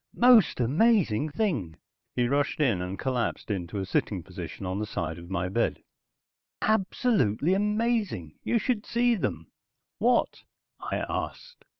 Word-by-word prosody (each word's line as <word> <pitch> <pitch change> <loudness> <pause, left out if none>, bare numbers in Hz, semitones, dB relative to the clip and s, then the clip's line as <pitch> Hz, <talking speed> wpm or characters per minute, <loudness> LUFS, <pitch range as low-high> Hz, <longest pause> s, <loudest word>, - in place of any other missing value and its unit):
"Most 240 - +6
amazing 155 - +3
thing," 145 - -1 0.4
he 120 -1 +2
rushed 140 +3 0
in 120 -11 +2
and 90 +2 -4
collapsed 125 -4 -2
into 95 0 -3
a 95 - -2
sitting 95 -1 -1
position 90 0 -7
on 95 +2 -2
the 105 - -2
side 85 -4 -4
of 85 0 -11
my 90 -1 -1
bed. 110 +6 -1 0.8
"Absolutely 190 - +1
amazing. 210 - 0
You 235 - +1
should 230 -2 0
see 240 +1 +2
them." 215 - -3 0.5
"What?" - - +2 0.4
I - - -3
asked. - - -5
125 Hz, 135 wpm, -27 LUFS, -, 0.8 s, Most